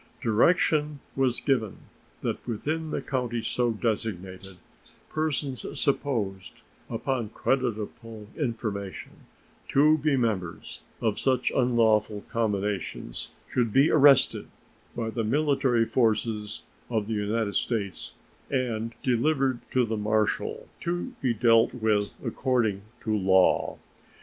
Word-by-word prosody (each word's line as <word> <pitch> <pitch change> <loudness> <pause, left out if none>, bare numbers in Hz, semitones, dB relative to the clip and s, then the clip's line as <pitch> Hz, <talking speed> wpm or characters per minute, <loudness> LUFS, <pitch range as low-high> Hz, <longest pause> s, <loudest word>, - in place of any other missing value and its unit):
Direction 150 +5 +2 0.2
was 130 -2 +1
given 115 -7 0 0.4
that - - -3
within 155 +8 -2
the - - -3
counties 120 -3 -2
so 120 +1 +1
designated 95 -4 -3 0.5
persons 145 -4 -2 0.2
supposed, 110 - -1 0.4
upon 125 -5 -2
creditable 115 -3 -2
information, 110 - -4 0.6
to 155 +3 +4
be 145 -2 +2
members 100 -8 -2 0.2
of 110 -3 0
such 130 -2 +1
unlawful 110 -4 +2
combinations 105 - -2
should 120 -3 0
be 135 +7 +4
arrested 140 -3 +5 0.5
by 115 -1 -2
the 115 0 -2
military 135 -1 +2
forces 110 -2 0 0.3
of 110 -3 0
the 110 - -3
United 105 0 -1
States 100 -2 -2 0.4
and 115 -4 -1
delivered 130 0 +2
to 125 -1 +2
the 110 -1 -2
marshal, 105 0 0
to 175 +9 -3
be 130 - +2
dealt 115 +1 +4
with 110 -3 0
according 120 -7 0 0.2
to 110 -2 0
law. 95 -2 +3
115 Hz, 110 wpm, -27 LUFS, 105-130 Hz, 0.6 s, arrested